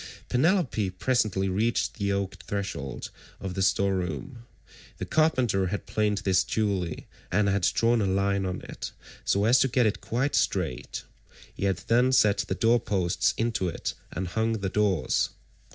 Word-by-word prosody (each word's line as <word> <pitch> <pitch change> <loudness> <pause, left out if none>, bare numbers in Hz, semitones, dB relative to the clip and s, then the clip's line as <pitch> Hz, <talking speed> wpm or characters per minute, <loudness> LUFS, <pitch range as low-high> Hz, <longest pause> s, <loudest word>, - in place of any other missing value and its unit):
Penelope 130 - +2
presently 95 -1 0
reached 105 +5 0
the 100 -1 0
oak 100 -1 -1
threshold 95 -10 -4 0.3
of 95 -2 -5
the 95 - -2
store 100 +1 +2
room; 95 - -4 0.5
the - - -4
carpenter 130 -12 +2
had 100 +3 -3
planed 105 -1 0
this 95 -1 +4
duly, 95 -5 -1 0.3
and 100 +2 +2
had 100 0 +1
drawn 115 +6 +2
a 100 - +1
line 100 +1 +1
on 90 -1 -3
it - - -7 0.3
so 100 +1 +2
as 120 +4 +5
to - - +4
get 125 -1 +2
it 105 - 0
quite 130 +5 -1
straight; 80 -10 -1 0.5
he - - -3
had 95 -3 +1
then 125 +3 +3
set 105 -5 +4
the - - -1
door 115 +1 +3
posts 95 -6 0
into 110 -5 0
it - - -4 0.2
and 90 +2 -3
hung 110 +4 0
the 100 -4 -2
doors. 100 -5 +1
100 Hz, 165 wpm, -27 LUFS, 95-115 Hz, 0.5 s, as